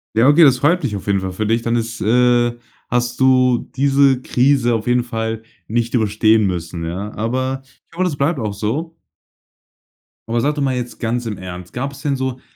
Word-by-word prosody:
Ja, 115 +3 +4
okay. 150 +4 +6
Das 135 -5 +6
freut 170 +7 +2
mich 115 -8 -2
auf 100 - -8
jeden 100 -1 +1
Fall 95 0 -4
für 110 +4 -3
dich. 115 +2 +1
Dann 120 0 0
ist 115 -1 -3
äh, 120 +1 +2 0.3
hast 120 +1 -1
du 130 -2 +3
diese 135 -1 +3
Krise 130 -2 +2
auf 110 +1 -3
jeden 125 0 +2
Fall 110 -1 -3 0.3
nicht 120 +2 -1
überstehen 110 -1 +3
müssen, 85 -2 -4
ja, 95 +6 -5
aber 130 +4 -2 0.2
ich - - -46
hoffe, 180 - -2
das 170 -6 -1
bleibt 140 0 0
auch 105 -2 -2
so. 140 +12 -3 1.3
Aber 115 0 0
sag 145 +3 +1
doch 145 - -2
mal 130 -2 0
jetzt 125 -1 -5
ganz 120 +1 -2
im 105 -3 -4
Ernst 90 0 -9
gab 135 +3 -4
es 135 - -12
denn 145 -2 0
so 130 -1 -3
120 Hz, 205 wpm, -19 LUFS, 110-135 Hz, 1.3 s, okay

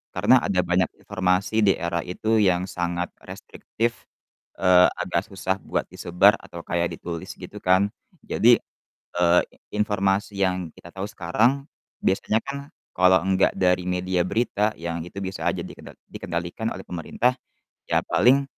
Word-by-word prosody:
Karena 130 - +5
ada 95 -2 0
banyak 90 0 +3 0.2
informasi 95 +3 0
di 95 - +6
era 85 0 -2
itu 110 +4 +1
yang 90 -3 +3
sangat 85 0 -2 0.2
restriktif, 115 +1 -3 0.7
eee, 90 -1 +7 0.2
agak - - -1
susah 95 0 -2
buat - - -1
disebar 95 +5 +4
atau 85 - -9
kayak 85 0 -1
ditulis 85 -2 -6
gitu - - -9
kan. 95 +2 +4 0.4
Jadi, - - +5 0.6
eee, 90 0 +5 0.4
informasi 100 0 0
yang 90 -2 -2
kita 85 - -13
tahu 95 +1 -3
sekarang 115 +11 +1 0.4
biasanya 105 +3 +2
kan 140 0 -4 0.4
kalau 90 0 +5
enggak 95 0 +3
dari 90 -1 +2
media 90 0 0
berita 110 -1 0
yang 85 0 -3
itu 95 - -12
bisa 95 0 -4
aja - - -3
dikedot - - -12
dikendalikan 85 +6 -4
oleh - - -8
pemerintah, 100 +9 0 0.6
ya - - +3
paling 135 +3 +4
95 Hz, 140 wpm, -24 LUFS, 90-105 Hz, 0.7 s, eee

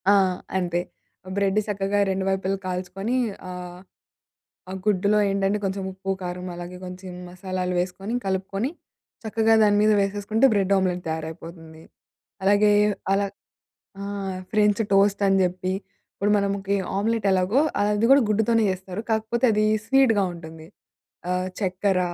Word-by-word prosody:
ఆ! - - +7 0.4
అంతే. 175 -2 0 0.6
బ్రెడ్ 200 0 +1
సక్కగా 200 0 0
2 190 0 -1
వైపులా 190 0 0
కాల్చుకొని, 185 +5 -3 0.3
ఆహ్, 180 0 -8 0.9
ఆ - - -4
గుడ్డులో 205 0 +2
ఏంటంటే 195 +1 +1
కొంచెం 195 0 -2
ఉప్పు, 190 +1 -8
కారం 180 0 -5
అలాగే 175 +1 -7
కొంచెం 180 0 -8 0.2
మసాలాలు 185 0 -3
వేసుకొని 190 +4 -3
కలుపుకొని, 195 +6 -2 0.5
చక్కగా 225 0 +2
దాని 205 -1 +4
మీద 215 0 +4
వేసేసుకుంటే 205 +4 +1
బ్రెడ్ 200 -1 +2
ఆమ్లెట్ 180 -2 0
తయారైపోతుంది. 160 0 -7 0.6
అలాగే, 205 +2 +4 0.4
అలా 200 0 +1 0.7
ఆ! - - -4 0.5
ఫ్రెంచ్ 210 0 +3
టోస్ట్ 200 +1 +3
అని 195 0 +4
జెప్పి 185 +1 -1 0.4
ఇప్పుడు 205 +1 0
మనముకి 200 0 0 0.2
ఆమ్లెట్ 220 +1 0
ఎలాగో 190 +8 +3 0.2
అది 210 +2 +2
గూడా 275 +1 +7
గుడ్డుతోనే 220 +2 +2
చేస్తారు. 185 +2 -5
కాకపోతే 220 +3 +1
అది 210 0 +2 0.2
స్వీట్‌గా 255 -7 +4
ఉంటుంది. 160 -1 -11 0.6
ఆహ్, 180 0 0
చక్కెర, 190 0 +1
195 Hz, 125 wpm, -24 LUFS, 180-210 Hz, 0.9 s, ఆ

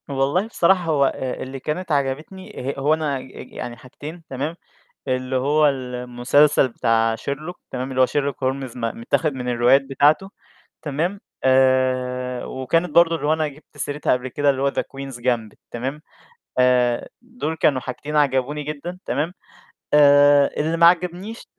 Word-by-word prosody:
والله 140 +9 0
بصراحة 185 -4 +2
هو 150 -4 +2
آآ، 130 -1 -3
اللي 135 +1 -7
كانت 155 +5 -4
عجبتني 140 +1 -3
ه - - -7
هو 145 +3 +3
أنا 155 -3 -1
أج 130 - -12
أج - - -10
يعني 120 -1 -6
حاجتين 150 +7 -10
تمام، 145 +5 -3 0.5
اللي 130 0 -1
هو 145 +4 +3
المسلسل 125 +2 +2
بتاع 115 -2 +1
Sherlock 150 +8 -5 0.2
تمام 130 +1 -4
اللي 130 0 -1
هو 130 - +6
Sherlock 140 0 -1
Holmes 130 -1 -3
م - - -7 0.2
متّاخد 150 +6 0
من 125 -1 -5
الروايات 125 +3 +4
بتاعته 145 +7 +2 0.5
تمام، 165 +7 -2 0.2
آآ، 130 -1 +2
وكانت 165 +7 -1
برضه 170 -1 +4
اللي 155 - -4
هو 155 - +3
أنا 155 -1 0
جبت 145 +1 -16
سيرتها 145 +1 -1
قبل 125 +1 -1
كده 145 +3 +1
اللي 135 -1 -1
هو 140 - +2
The - - -1
Queen's 135 -2 -8
Gambit 120 -3 -1
تمام، 135 +6 -4 0.6
آآ 125 -1 +3
دول 240 -10 -5
كانوا 140 -4 +2
حاجتين 145 +4 -6
عَجَبوني 145 0 +1
جدًا 155 +5 -6
تمام، 155 +5 -1 0.6
آآ 145 -1 +6
اللي 160 +2 0
ما 170 0 +6
عَجَبنيش 180 +5 +1
140 Hz, 160 wpm, -22 LUFS, 130-155 Hz, 0.6 s, هو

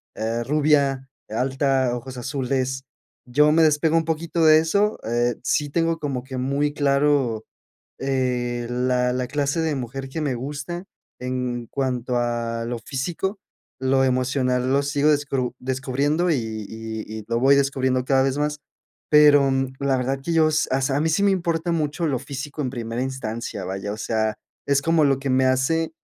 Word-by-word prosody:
eh, 115 +2 -2
rubia 140 -1 +2 0.2
alta, 130 +1 +1
ojos 125 +1 -7
azules. 130 0 -2 0.4
Yo 150 +4 +4
me 160 +1 +5
despego 155 +1 +3
un 165 - +1
poquito 165 0 0
de 155 0 +8
eso, 200 +6 +1
eh, 120 +1 0
sí, 145 +2 0
tengo 165 +1 +1
como 135 -4 -3
que 130 -1 -7
muy 140 +3 0
claro, 140 -5 +1 0.5
eh, 125 -3 -1
la 125 0 +1
la 125 0 -1
clase 145 +3 0
de 160 -2 0
mujer 135 +1 -5
que 160 +4 -5
me 140 -4 0
gusta 145 +8 -5 0.4
en 125 -1 -3
cuanto 125 -2 -2
a 115 -1 -2
lo 120 0 -3
físico, 175 - -3 0.4
lo 130 0 +2
emocional 130 0 +1
lo 140 +1 +3
sigo 145 +1 +1
descru 135 -4 0
descubriendo 135 +6 0
y - - +3
y 110 -1 -5 0.2
y - - -12
lo 115 - +1
voy 135 +2 +6
descubriendo 130 -2 +1
cada 135 0 +3
vez 135 0 0
más. 150 0 -1 0.5
Pero, 145 -2 +6
mm, 135 0 -1
la 140 -1 +2
verdad 135 +2 -1
que 170 - -1
yo 160 -1 +5
s 155 0 +1
as 135 +1 +1
a 135 - +1
mí 160 - +1
sí 180 +5 +1
me 200 - +4
importa 170 -2 -1
mucho 160 +1 -1
lo 135 -4 0
físico 140 +2 -6
en 130 - -1
primera 120 -1 -4
instancia, 115 -6 -4
vaya, 95 +2 -4
o - - -8
sea, 110 -1 -1 0.3
es 140 -1 +3
como 165 -2 +3
lo 135 -2 +3
que 135 - -4
me 130 0 +3
hace, 160 +6 +1
135 Hz, 175 wpm, -23 LUFS, 125-150 Hz, 0.5 s, de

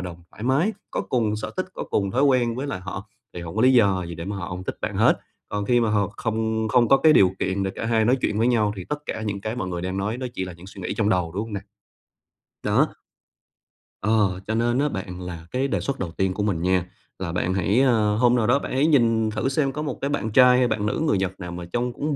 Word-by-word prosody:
đồng, 85 -1 -7
thoải - - -12
mái, 140 - +2 0.2
có - - -1
cùng 110 -4 0
sở 105 - -5
thích, 185 - -1
có - - -4
cùng 100 -1 -1
thói 130 +7 +1
quen 125 -4 +3
với 130 +4 -3
lại 115 -10 -4
họ 95 +2 -7 0.3
thì 90 - -5
hổng 85 +4 -7
có 110 - +2
lý 130 - +6
do 100 -7 +4
gì 85 0 -6
để 85 +1 -6
mà 100 +2 -4
họ 90 -2 -5
hông 90 +1 -6
thích - - -4
bạn - - -3
hết. - - +4 0.3
Còn 105 0 -2
khi 120 +3 +3
mà 115 -2 +1
họ 105 -1 +1
không 110 -1 -1
không 120 +1 +4
có 135 - +7
cái 155 +3 +5
điều 95 -9 +5
kiện 95 +1 -1
để 95 - -1
cả - - -4
hai 110 -1 +2
nói 125 +4 +4
chuyện 105 - 0
với 115 - +3
nhau 110 -4 +2
thì 95 - -6
tất 150 - -2
cả 110 - -4
những 105 -2 -3
cái 110 +4 -4
mọi 95 - -3
người 85 -1 -4
đang 95 +1 -3
nói 105 +4 -2
nó 130 - -3
chỉ 95 - -2
là 90 - -7
những 85 +2 -14
suy 95 0 -10
nghĩ - - -3
trong 105 -2 +1
đầu, 90 -4 +1
đúng 95 - -2
hông 115 - -9
nè? 100 - -2 1.0
Đó! - - +3 1.1
Ờ, 100 -3 +2
cho 110 - -1
nên 120 +2 +1
á 145 +1 +2
bạn, 90 -5 -6
là 85 -2 -7
cái 130 +2 0
đề - - -1
xuất 140 -1 -3
đầu 90 -3 -3
tiên 95 +2 0
của 105 - -2
mình 95 -6 0
nha 90 0 +2 0.3
là 90 -3 -3
bạn 90 +1 -1
hãy, 95 +5 +2
ờ 110 -5 +3
hôm 120 +2 +4
nào 115 -3 +1
đó 130 +4 +4
bạn - - -6
hãy 140 +4 +3
nhìn 115 -6 +3
thử 110 +5 -1
xem 135 0 +1
có 150 - -4
một 145 -4 -3
cái 140 - -1
bạn 110 -7 -2
trai 125 +1 +7
hay 125 -1 +3
bạn 110 -2 -1
nữ 105 - -1
người 145 - +3
Nhật 95 0 -2
nào 90 -2 -6
mà 85 0 -6
trông 120 0 -1
cũng 150 +2 -2
110 Hz, 285 wpm, -24 LUFS, 95-125 Hz, 1.1 s, có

